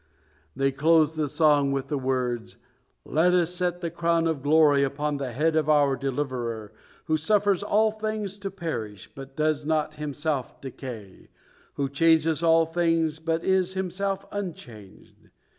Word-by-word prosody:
They 135 0 +1
closed 160 +2 +3
the 155 -2 -1
song 145 -2 +3
with 135 0 -3
the 145 - -1
words: 125 -3 -2 0.5
"Let 175 +5 +2
us 175 -1 +1
set 180 -1 -2
the 170 -2 -3
crown 170 0 +1
of 160 -4 -1
glory 145 -1 +4
upon 145 +2 -1
the 135 -3 -4
head 155 +6 0
of 155 -1 +1
our 145 -2 +4
Deliverer, 125 -5 -4 0.3
who 155 -1 +1
suffers 200 +3 +2
all 215 +1 +2
things 215 -2 -4
to 200 -1 -4
perish, 155 - -6
but 135 0 -11
does 155 -1 0
not 155 0 0
Himself 150 -2 -3
decay, 120 -7 -9 0.5
who 140 - -1
changes 160 +2 +2
all 165 -1 +4
things, 165 -1 0
but 165 +1 -2
is 190 0 +1
Himself 190 +1 -2
unchanged. 120 - -9
155 Hz, 150 wpm, -26 LUFS, 135-170 Hz, 0.5 s, glory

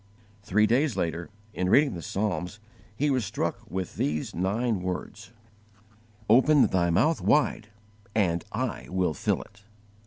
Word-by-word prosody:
Three 105 +2 +2
days 130 +4 +1
later, 85 0 -2 0.2
in 90 0 -1
reading 140 +5 +4
the 85 - -6
Psalms, 100 +1 -3 0.4
he 145 +5 +1
was 130 -3 +1
struck 95 - -2
with 95 +2 -4
these 75 +1 -1
nine 105 +3 0
words: 95 +5 -5 1.0
"OPEN 135 +6 +5
THY 85 -2 +1
MOUTH 155 - +2
WIDE, 145 -7 +2 0.5
AND 85 -6 +1
I 65 - -3
WILL 90 -3 0
FILL - - -1
IT." 100 0 -22
100 Hz, 135 wpm, -27 LUFS, 90-120 Hz, 1.0 s, OPEN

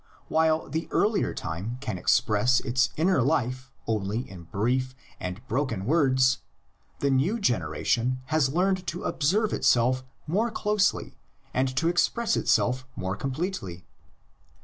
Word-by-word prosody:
While 160 0 +2
the 160 +1 -3
earlier 210 0 +1
time 90 +10 -5
can 110 -9 -4
express 115 +8 +3
its 125 0 +1
inner 170 -1 +3
life 130 -1 0 0.2
only 110 +3 -2
in 90 -3 -11
brief 130 +8 -1 0.2
and 90 +6 -6
broken 115 -5 -1
words, 130 -3 +3 0.6
the 140 - +2
new 155 - +2
generation 120 - 0 0.2
has 155 -4 +3
learned 185 +3 +1
to 175 +5 -4
observe 200 +9 +1
itself 125 +2 +3 0.2
more 205 +9 +1
closely 210 -2 0 0.4
and 130 +1 +2
to 165 - +2
express 220 +7 +1
itself 125 +2 +1
more 95 +1 -3
com 135 +5 -3
pletely. 130 - -4
130 Hz, 130 wpm, -27 LUFS, 115-165 Hz, 0.6 s, express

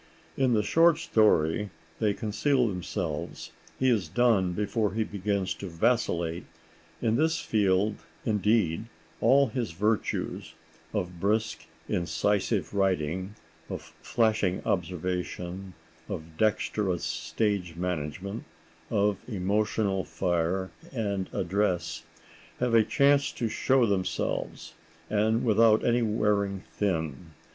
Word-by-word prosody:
In 130 -2 +2
the 105 - +2
short 165 +8 +5
story 105 -3 +2 0.3
they 105 -2 +1
conceal 125 +4 +1
themselves; 90 -4 -4 0.3
he 130 - +1
is 110 -9 +2
done 95 -1 +2
before 105 +1 0
he 110 - +2
begins 100 -2 -1
to 100 - -7
vacillate. 85 -3 0 0.6
In 115 0 +2
this 160 +3 +2
field, 100 0 +1 0.3
indeed, 105 -3 +2 0.3
all 135 +3 +5
his 115 -6 -3
virtues—of 90 -3 -3
brisk, 110 +4 0 0.2
incisive 90 +2 0
writing, 95 0 0 0.3
of - - -5 0.2
flashing 110 -5 +1
observation, 90 +1 -3 0.3
of 80 0 -6
dexterous 105 -2 0
stage 80 +3 -1
management, 90 +4 -3 0.5
of 105 -2 +1
emotional 100 -1 0
fire 90 +1 -1 0.2
and 100 -6 -2
address—have 85 +4 -3
a 115 -1 +6
chance 140 +3 +3
to 120 - -2
show 130 +3 +2
themselves, 95 -4 -2 0.4
and 110 +3 +2
without 110 -1 +4
any 120 0 +3
wearing 105 -3 +1
thin. 80 -5 -2
100 Hz, 100 wpm, -28 LUFS, 90-110 Hz, 0.6 s, a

